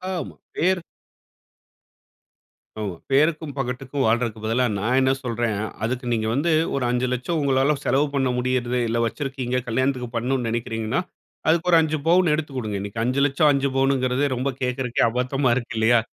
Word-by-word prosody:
ஆமா, 175 - -5 0.2
பேர் 185 +2 +2 2.0
ஆமா, 100 -4 -3 0.2
பேருக்கும் 155 +1 +2
பகட்டுக்கும் 135 +2 -2
வாழ்றதுக்கு 110 -1 0
பதிலா 120 +3 +2
நான் 120 +6 +1
என்ன 130 0 +3
சொல்றேன், 120 -2 -1 0.3
அதுக்கு 125 +3 -2
நீங்க 110 -1 0
வந்து 150 +7 +1 0.2
ஒரு 135 - -1
5 125 +1 +1
லட்சம் 140 +7 -1
உங்களால 135 +1 +2
செலவு 145 +3 +2
பண்ண 135 -2 +2
முடியறது, 125 0 0
இல்ல 115 +1 -1
வச்சிருக்கீங்க, 130 0 -3
கல்யாணத்துக்கு 130 +1 0
பண்ணனும் 125 +2 0
நெனைக்கிறீங்கன்னா, 115 +3 -1 0.5
அதுக்கு 170 +2 +2
ஒரு 170 - +7
5 155 0 0
பவுன் 175 -1 +4
எடுத்து 150 -1 -2
குடுங்க. 110 -6 -3
இன்னைக்கு 100 +3 -4
5 130 +3 0
லட்சம் 145 +2 +3
5 140 -1 +1
பவுனுங்கிறதே 135 0 +2
ரொம்ப 130 +3 -1
கே்க்கறதுக்கே 125 -1 0
அபத்தமா 125 +3 0
இருக்கு 120 -3 -4
இல்லையா? 115 +2 +4
130 Hz, 150 wpm, -23 LUFS, 120-140 Hz, 2.0 s, ஒரு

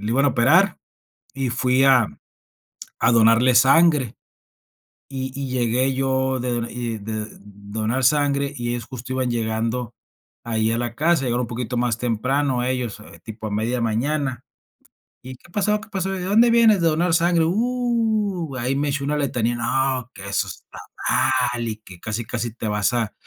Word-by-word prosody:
iban 135 +4 +2
a - - +5
operar 160 +10 +3 0.6
y 135 -2 -2
fui 125 +2 +2
a 130 -5 +5 0.9
a 115 - +3
donarle 115 +2 +5
sangre. 135 0 +4 1.0
Y 130 -1 -4
y 135 -2 -4
llegué 125 +1 +1
yo 130 0 0
de 125 0 -2
do 120 -1 -2
y 120 -2 -4
de 110 +1 -5
donar 105 +5 -4
sangre, 140 0 +2
y 120 -1 -4
ellos, 120 -1 -3
justo, 130 0 -8
iban 130 -1 -1
llegando 115 +1 -2 0.5
ahí 110 -1 0
a 115 - 0
la 120 -1 -3
casa, 160 0 +2
llegaron 120 0 0
un 125 - -3
poquito 125 +2 -4
más 120 -1 0
temprano 125 +3 0
ellos, 125 -5 -3 0.2
tipo 110 -1 -7
a - - -6
media 115 +4 -1
mañana. 130 +3 -1 0.8
"¿Y 130 - -8
qué 175 - -21
pasó? 210 +2 +1
¿Qué 220 - -13
pasó? 195 -1 -2
¿De 185 - -4
dónde 225 +5 +4
vienes?". 225 -5 +5
"¿De 165 - +2
donar 165 +2 +1
sangre? 170 0 +3
Uh, 220 - 0
ahí 130 +3 -1
me 145 +1 0
echó 140 0 -2
una 150 +2 0
letanía, 120 -4 0
no, 130 0 -1
que 100 - -11
eso 100 - 0
está - - -11 0.7
mal, 120 -1 -3
y 110 - -4
que 95 -5 -14
casi 110 +3 -4
casi 120 0 -4
te 115 -2 -4
vas 105 +2 +1
a 115 -4 -1
125 Hz, 175 wpm, -22 LUFS, 115-145 Hz, 1.0 s, a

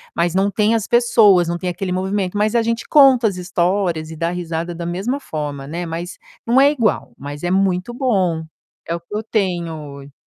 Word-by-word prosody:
mas 170 +1 0
não 195 +1 +2
tem 215 +2 +2
as 225 - -1
pessoas. 220 -7 +4
Não 170 0 -2
tem 180 0 -3
aquele 180 +1 -4
movimento, 190 +1 -1
mas 215 +2 +1
a 235 - +4
gente 230 0 -2
conta 265 -6 +6
as 195 - -3
histórias 175 -2 -1
e - - -7
dá 165 +1 -1
risada 170 -1 -4
da 170 - -5
mesma 195 +11 -2
forma, 145 - -5
né, 170 +5 -5
mas 170 +2 -6 0.3
não 240 +3 +3
é 280 - +6
igual, 235 -8 -1
mas 145 +2 -8
é 175 - -1
muito 190 +3 +1
bom. 190 - 0 0.4
É 170 - -2
o - - -5
que 170 +5 -10
eu 215 - -2
tenho 170 -9 -3
ho 140 - -15
180 Hz, 210 wpm, -19 LUFS, 170-215 Hz, 0.4 s, conta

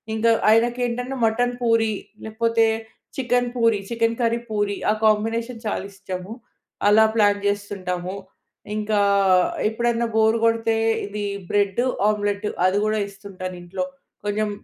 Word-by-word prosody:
ఇంకా 230 +1 +3 0.2
ఆయనకి 240 +2 +3
ఏంటంటే 250 +3 -4
మటన్ 245 +2 +1
పూరి 225 -2 +2 0.3
లేకపోతే 230 +1 +1 0.5
chicken 245 -1 +1
puri, 230 -3 +3
chicken 230 0 +1
curry 235 0 +2
Puri 205 -1 0 0.2
ఆ - - +3
కాంబినేషన్ 225 +2 0
చాలా 205 - -2
ఇష్టము. 185 +1 -7 0.6
అలా 215 +2 +6
ప్లాన్ 205 -2 +3
చేస్తుంటాము. 190 -3 -3 0.6
ఇంకా 215 0 0 0.7
ఎప్పుడన్నా 235 +1 0
బోర్ 220 0 +4
కొడితే, 225 0 +2 0.3
ఇది 205 +1 -5 0.3
బ్రెడు 205 +3 +1 0.2
ఆమ్లెటు 205 -1 0 0.2
అది 190 +2 +1
కూడా 215 0 +1
ఇస్తుంటాను 195 -2 -8
ఇంట్లో. 190 +10 -4 0.4
కొంచెం 210 +1 0
220 Hz, 125 wpm, -23 LUFS, 205-230 Hz, 0.7 s, అలా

